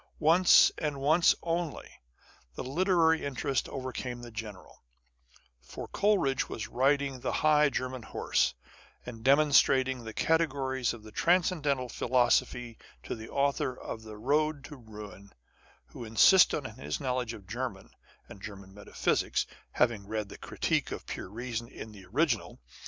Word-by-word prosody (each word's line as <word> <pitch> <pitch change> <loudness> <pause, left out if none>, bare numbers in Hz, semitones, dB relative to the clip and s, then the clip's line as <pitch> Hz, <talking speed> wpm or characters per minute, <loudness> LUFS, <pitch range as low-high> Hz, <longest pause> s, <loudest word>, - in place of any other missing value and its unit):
Once, 170 +4 +6
and 150 -3 -2
once 155 +5 +4
only, 170 -2 -3 0.7
the - - -5
literary 165 +2 +2
interest 135 -1 -2
overcame 125 -2 -5
the 120 - -9
general. 105 -4 -9 0.8
For - - -9
Coleridge 195 -11 +1
was 110 - -5
riding 135 +1 +1
the - - -2
high 150 -1 +5
German 130 -2 -4
horse, 70 - 0 0.5
and 115 -2 -9
demon 140 +4 +4
strating 130 -2 +3
the 110 - -7
Categories 135 -4 0
of 110 - -14
the 110 - -12
Transcendental 155 - +1
Philosophy 120 -1 0 0.2
to - - -5
the 110 0 -9
Author 140 -2 0
of 110 - -7
the 110 -1 -10
Boad 145 +5 0
to 150 - -10
Ruin; 105 -5 -12 0.5
who - - -10
insisted 140 - +5
on 110 - -8
his 75 +1 -4
knowledge 125 -3 -2
of 105 -4 -11
German, 120 +5 -5 0.4
and 100 - -13
German 100 -2 -10
metaphysics, 105 0 -1 0.3
having 115 -5 +1
read 105 -1 -3
the - - -10
Critique - - -1
of - - -6
Pure - - -6
Reason 115 +2 -5
in 110 - -10
the 100 -3 -13
original. 130 - 0
130 Hz, 145 wpm, -29 LUFS, 110-145 Hz, 0.8 s, Once